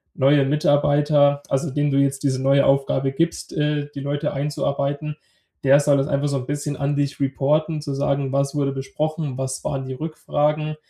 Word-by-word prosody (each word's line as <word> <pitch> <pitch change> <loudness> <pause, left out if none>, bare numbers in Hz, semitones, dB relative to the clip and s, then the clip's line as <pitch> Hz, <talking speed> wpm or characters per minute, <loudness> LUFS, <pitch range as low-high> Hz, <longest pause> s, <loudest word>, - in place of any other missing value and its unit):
neue 140 +1 +4
Mitarbeiter, 145 0 +3
also, 135 +4 -1
dem 145 +1 0
du 135 - +1
jetzt 140 0 0
diese 130 -2 0
neue 140 +1 +4
Aufgabe 135 0 +1
gibst, 165 +5 -2
äh, 150 -1 0
die - - -6
Leute 145 +2 -2
einzuarbeiten, 145 +1 -2 0.5
der 140 +1 +6
soll 145 -1 +3
das 135 0 0
einfach 140 0 0
so 140 -1 -1
'n 125 -1 -5
bisschen 145 0 -3
an 140 0 -1
dich 145 0 -1
reporten, 150 +3 0
zu 145 -2 -4
sagen: 140 -1 -1
„Was 140 +1 0
wurde 140 -1 0
besprochen? 140 +1 -3
Was 130 0 -4
waren 135 -2 -3
die 130 - -5
Rückfragen? 150 +1 -1
140 Hz, 180 wpm, -22 LUFS, 135-150 Hz, 0.5 s, der